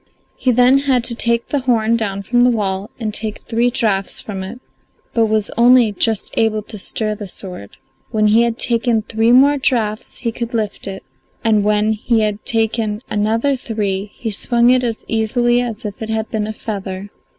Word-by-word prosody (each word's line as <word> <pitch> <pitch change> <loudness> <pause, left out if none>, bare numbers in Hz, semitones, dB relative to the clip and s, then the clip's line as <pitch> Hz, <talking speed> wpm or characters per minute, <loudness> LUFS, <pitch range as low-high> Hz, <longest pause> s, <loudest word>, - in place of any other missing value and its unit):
He 255 - +1
then 250 +3 +5
had 265 -3 +1
to 235 - +1
take 235 0 0
the 285 - 0
horn 230 -3 +2
down 200 -3 -2
from 245 +5 +2
the 250 - +5
wall 200 -3 -1
and 215 -3 -3
take 215 0 -5
three 235 +1 +1
draughts 215 -6 -1
from 195 -3 -5
it, 200 +6 -7 0.5
but 225 -1 +3
was 215 -1 0
only 240 -1 +5
just 215 +1 -1
able 220 -2 +1
to 210 0 -9
stir 215 +2 -1
the 210 -1 -7
sword. 180 - -9 0.3
When 215 -2 +1
he 215 +2 +5
had 235 -1 0
taken 235 -2 +1
three 225 +2 +1
more 280 +3 +5
draughts 220 -5 -1
he 235 - -2
could 235 +1 -5
lift 210 -3 -3
it, 195 0 -6 0.4
and 215 -3 +3
when 210 +1 +2
he 225 +1 0
had 210 -1 -1
taken 225 -1 0
another 225 +6 +1
three 205 -5 -3
he 225 - -4
swung 235 +4 +3
it 255 0 +3
as 230 -2 -3
easily 240 +2 +1
as 230 -3 -5
if 205 +1 -6
it 220 - -4
had 220 0 -2
been 215 -2 -1
a 215 - -4
feather. 200 -2 -6
220 Hz, 195 wpm, -18 LUFS, 210-240 Hz, 0.5 s, then